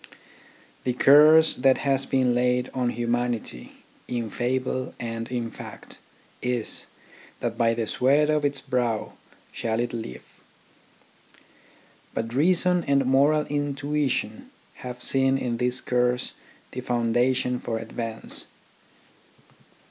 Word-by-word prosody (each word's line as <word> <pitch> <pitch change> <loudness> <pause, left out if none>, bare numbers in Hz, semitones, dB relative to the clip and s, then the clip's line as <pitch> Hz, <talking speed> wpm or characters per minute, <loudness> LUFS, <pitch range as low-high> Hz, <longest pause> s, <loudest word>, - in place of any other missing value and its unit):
The 125 - 0
curse 150 +5 +7
that 130 +1 +3
has 135 -1 0
been 130 -2 +2
laid 125 +1 +1
on 125 -2 0
humanity, 120 - -2 0.3
in 120 -3 -3
fable 130 +1 -2
and 115 -1 -4
in 120 -2 -3
fact, - - -11 0.4
is, 125 -3 -2 0.5
that - - -2
by 115 -1 +2
the 115 -1 -1
sweat 140 +7 +3
of 150 -1 +1
its 140 -1 0
brow 125 -5 -1 0.4
shall 110 0 -2
it 120 0 -2
live. 65 - -8 1.7
But 115 +1 -3
reason 180 +4 +3
and 140 -1 +2
moral 145 +4 +3
intui 145 0 -1
tion 110 -3 -3 0.3
have 125 -1 -7
seen 135 0 +2
in 120 -3 -2
this 125 +1 -1
curse 125 0 0 0.4
the 125 - -5
foundation 125 +1 +1
for 115 -1 -3
advance. 115 0 -4
125 Hz, 120 wpm, -25 LUFS, 120-135 Hz, 1.7 s, curse